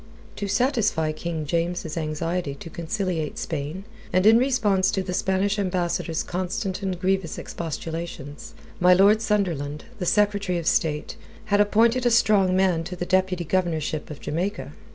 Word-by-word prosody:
To 205 - -3
satisfy 205 - +1
King 160 0 -4
James's 170 0 -2
anxiety 155 -1 -2
to 165 - -10
conciliate 170 -2 -3
Spain, 150 +7 -4 0.3
and 185 +1 +2
in 225 +2 +7
response 210 -8 +2
to 190 -2 -1
the 180 -1 -4
Spanish 195 +3 +1
Ambassador's 175 -3 -1
constant 185 +2 -3
and 190 -3 -3
grievous 190 -2 0
expostulations, 165 -3 -6 0.2
my 180 +1 +6
Lord 205 +4 +5
Sunderland, 165 -10 -1
the 180 - -2
Secretary 200 -3 +2
of 170 - -4
State, 150 -2 0 0.4
had 205 - +6
appointed 230 +4 +3
a - - +5
strong 210 -5 +4
man 185 -3 +2
to 180 - -6
the 175 - -4
deputy 185 -1 +1
governorship 160 -3 -1
of 150 - -8
Jamaica. 180 +7 -3
180 Hz, 150 wpm, -24 LUFS, 165-200 Hz, 0.4 s, in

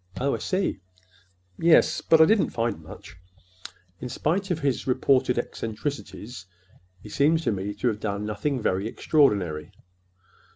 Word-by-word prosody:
"Oh, 140 +2 0
I - - -2
see." 190 - -1 0.8
"Yes; 165 -1 +4
but 160 - +4
I 160 - +8
didn't 215 +3 +3
find 115 -2 -2
much. - - -12 0.8
In 125 - -6
spite 185 +10 -1
of 175 -3 -1
his 140 -2 -1
reported 130 -1 +2
eccentricities, 115 -3 -5 0.6
he - - -10
seems 160 +3 +2
to - - +1
me 100 0 -4
to 105 - -2
have 105 -2 -3
done 105 -1 -3
nothing 125 +6 -2
very 95 -2 -1
extraordinary." 100 - +1
125 Hz, 140 wpm, -25 LUFS, 105-150 Hz, 0.8 s, I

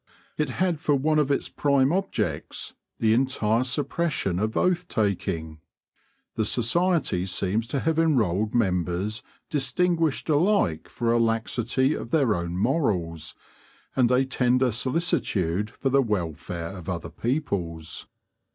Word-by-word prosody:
It 150 -3 -1
had 180 -4 +1
for 150 -2 +2
one 155 +3 +2
of 145 -2 +1
its 140 - +1
prime 140 0 +2
objects 195 +1 -2 0.2
the 110 -1 +3
entire 115 -2 +1
suppression 140 - -1
of 110 +2 -1
oath 180 -1 +1
taking. 85 - -2 0.7
The 110 - 0
society 125 - +1
seems 95 +5 -1
to 135 +2 -2
have 160 0 +1
enrolled 110 - +2
members 95 0 0 0.3
distinguished 160 +3 +1
alike 155 - +2
for 115 -1 -1
a 120 - +3
laxity 115 +4 +1
of 115 - -5
their 135 -6 +3
own 85 -1 -3
morals 90 - 0 0.6
and 125 -3 +4
a 130 +1 +3
tender 125 -1 +2
solicitude 120 - 0
for 135 +3 -2
the 135 +1 +5
welfare 85 - -3
of 90 -1 -8
other 85 -2 -4
people's. 85 - -3
120 Hz, 130 wpm, -25 LUFS, 95-145 Hz, 0.7 s, the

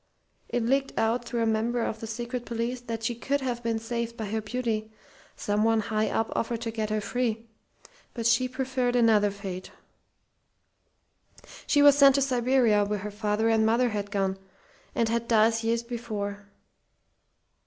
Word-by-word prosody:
It 240 -2 -1
leaked 270 +3 0
out 230 +2 +1
through 235 -1 -1
a - - +2
member 225 +2 0
of 220 - -3
the 225 - -6
secret 240 +2 -4
police 240 +1 -3
that 230 -2 -5
she 240 - 0
could 275 +4 -1
have 245 -2 -2
been 230 -1 -1
saved 235 +1 -4
by 220 - -3
her 220 +2 -2
beauty 220 -1 -3 0.4
someone 215 +2 +1
high 215 +1 0
up 225 - -1
offered 230 0 -2
to 230 -1 -3
get 220 -1 -3
her 215 0 0
free. 230 +1 -2 0.7
But 230 -2 -4
she 230 +3 +3
preferred 255 -1 -1
another 220 -4 +4
fate. 195 -2 -7 2.0
"She 290 -1 +4
was 285 -1 +8
sent 275 -2 +7
to 280 - +2
Siberia 245 -4 +3
where 210 +1 -1
her 205 +1 -6
father 210 +1 0
and 225 -1 +3
mother 235 +3 +3
had 205 -2 -3
gone, 195 -1 -1 0.6
and 230 - +2
had 235 +1 -1
died 225 0 +3
years 230 +1 0
before. 210 -4 -5
230 Hz, 165 wpm, -27 LUFS, 215-240 Hz, 2.0 s, was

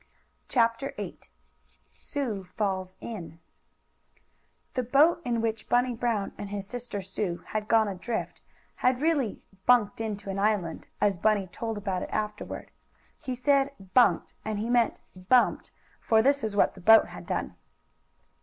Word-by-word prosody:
CHAPTER 230 +2 +1
VIII - - -6 0.7
SUE 240 -10 -4
FALLS 190 -3 -1
IN 170 -8 -7 1.3
The 255 - 0
boat, 285 +8 +4
in 235 -2 0
which 225 -1 -2
Bunny 245 +1 +3
Brown 230 -4 -1
and 205 - -5
his 200 -1 -4
sister 235 -1 -5
Sue 190 -2 -3
had 215 -1 -2
gone 220 -1 +4
adrift, 200 +4 -4 0.4
had 250 0 +2
really 290 -7 0 0.2
"bunked 230 -4 +4
into 205 -3 -4
an 195 - -3
island," 200 -6 0
as 200 -4 +2
Bunny 210 -1 +2
told 225 +4 -5
about 190 -3 -2
it - - -5
afterward. 210 0 -4 0.5
He 255 -3 -4
said 275 +2 +2 0.2
"bunked," 250 -2 +4
and 215 -1 -3
he 225 +3 -2
meant 240 -2 +2
bumped, 190 +7 +2 0.3
for 220 -1 +3
that 280 -1 +3
is 215 -2 -2
what 205 - +3
the 190 - -13
boat 225 +4 +7
had - - -10
done. - - -2
220 Hz, 145 wpm, -28 LUFS, 200-245 Hz, 1.3 s, boat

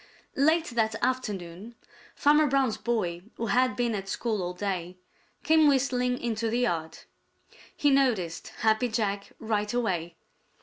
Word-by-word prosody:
Late 315 +4 +3
that 220 -2 0
afternoon 210 -4 -3 0.4
Farmer 300 +1 +4
Brown's 265 -5 +1
boy, 195 -7 -1
who 230 - -3
had 255 +1 +3
been 240 -2 0
at 195 -2 -4
school 220 -1 -2
all 180 0 -4
day, 185 -2 -3 0.5
came 315 0 +5
whistling 250 -3 +2
into 230 -2 -2
the 240 +2 0
yard. 165 -9 -1 0.8
He 290 - +3
noticed 230 -12 +1
Happy 220 +2 +3
Jack 205 -3 -2
right 210 -2 -1
away. 180 -9 -1
225 Hz, 135 wpm, -27 LUFS, 195-255 Hz, 0.8 s, came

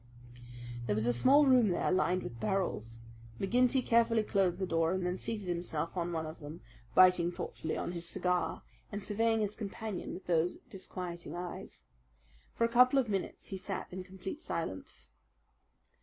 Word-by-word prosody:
There 105 - +1
was 110 +1 +1
a 120 - +3
small 275 - +6
room 250 -5 +5
there, 175 - +1
lined 185 0 +2
with 115 0 -7
barrels. 145 - -1 0.4
McGinty 250 +5 +3
carefully 230 -1 +4
closed 190 -4 +1
the 190 - -1
door, 165 -1 +1
and 185 -1 -1
then 180 0 0
seated 210 0 -4
himself 170 -2 -2
on 175 -1 -1
one 160 -1 -2
of 155 +1 -8
them, 155 +3 -9 0.3
biting 180 -2 +6
thoughtfully 160 - -4
on - - -2
his 170 -1 -4
cigar 180 0 0 0.3
and 205 -1 -4
surveying 225 +2 +1
his 210 0 -1
companion 215 -1 -5
with 190 - -10
those 170 0 +1
disquieting 180 -3 -6
eyes. 175 0 -7 0.7
For - - 0
a - - +5
couple 250 +3 +5
of 255 -4 +2
minutes 195 -3 -3
he 195 - -4
sat 190 -1 -5
in 185 0 -5
complete 190 - -7
silence. - - -5
185 Hz, 170 wpm, -32 LUFS, 170-220 Hz, 0.7 s, small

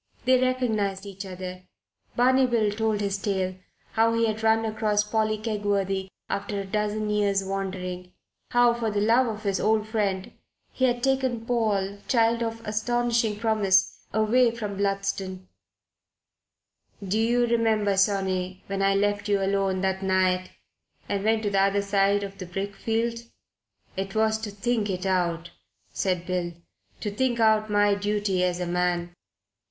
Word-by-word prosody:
They 255 0 +4
recognized 220 -7 0
each 195 0 -7
other. 185 0 -7 0.5
Barney 255 +2 +4
Bill 225 -4 +1
told 215 0 0
his 200 -1 -1
tale: 190 -2 -1 0.4
how 230 0 +2
he 230 0 +2
had 220 0 -2
run 225 0 +3
across 215 -1 +1
Polly 215 0 0
Kegworthy 200 -3 -1 0.2
after 200 0 -3
a 195 - -4
dozen 210 +2 -1
years' 200 -2 +1
wandering; 185 -2 -4 0.4
how, 245 -1 +4
for 235 -1 -2
love 225 +5 +3
of 215 -1 -5
his 200 -2 0
old 215 0 +1
friend, 200 -4 -1 0.4
he 260 - +1
had 245 -1 0
taken 260 -4 0
Paul, 205 -5 0
child 230 -1 +2
of 225 0 -4
astonishing 230 0 0
promise, 210 -4 +2
away 230 +3 +3
from 210 -3 -4
Bludston 195 -1 -2 1.6
"Do 210 +4 +1
you 240 +2 +3
remember, 220 -4 +2
sonny, 190 -2 0
when 195 0 -3
I 195 0 +3
left 205 +1 0
you 200 -1 +3
alone 195 -1 0
that 190 0 0
night 185 -1 +1 0.6
and 200 -1 -2
went 220 +1 +2
to 205 - 0
the 195 -1 +3
other 200 +1 +2
side 200 0 +2
of 195 0 -7
the 185 - -6
brickfield? 225 +5 -2 0.8
It 195 +1 -4
was 220 0 +2
to 220 -1 -5
think 210 +1 -1
it 185 0 -3
out," 175 -3 0 0.4
said 180 -2 -1
Bill. 180 -1 -2 0.5
"To 210 - -2
think 240 +2 0
out 220 -1 +3
my 205 0 +3
duty 205 -2 0
as 180 -1 0
a 180 - -2
man." 175 0 -1
205 Hz, 150 wpm, -26 LUFS, 195-225 Hz, 1.6 s, They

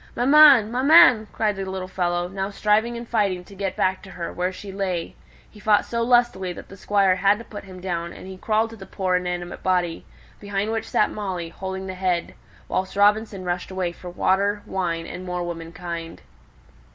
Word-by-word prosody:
"Maman, 270 -4 +7
maman!" 260 -3 +6
cried 215 -2 0
the 195 - -3
little 190 -1 -4
fellow, 175 -1 -1
now 195 +1 -4
striving 215 +3 +1
and 235 0 -8
fighting 200 -6 0
to 200 - -15
get 195 -1 -3
back 185 0 0
to 195 - -12
her, 170 -2 -6
where 180 +1 -1
she 195 +1 -9
lay; 185 -3 -3 0.3
he 210 - -17
fought 210 0 +3
so 235 0 -2
lustily 240 -6 +2
that - - -11
the 195 - -11
Squire 195 -2 +2
had 200 +2 +3
to 230 - -10
put 205 - -9
him 185 -1 -11
down, 170 -2 -3
and - - -11
he 190 0 -8
crawled 220 +3 0
to - - -9
the 195 -3 -11
poor 185 -1 -1
inanimate 180 -1 -4
body, 180 -3 0 0.4
behind 200 +1 -2
which 225 0 -3
sat 210 - +2
Molly, 185 -5 -4
holding 190 +2 -6
the 190 - -5
head; 180 -2 -1 0.3
whilst 190 +1 -2
Robinson 205 -1 +2
rushed 175 0 -3
away 185 -2 -2
for 175 +1 -10
water, 200 +3 +1
wine, 170 -3 -2
and 180 - -7
more 180 -1 -3
womankind. 170 0 -6
190 Hz, 195 wpm, -23 LUFS, 180-210 Hz, 0.4 s, Maman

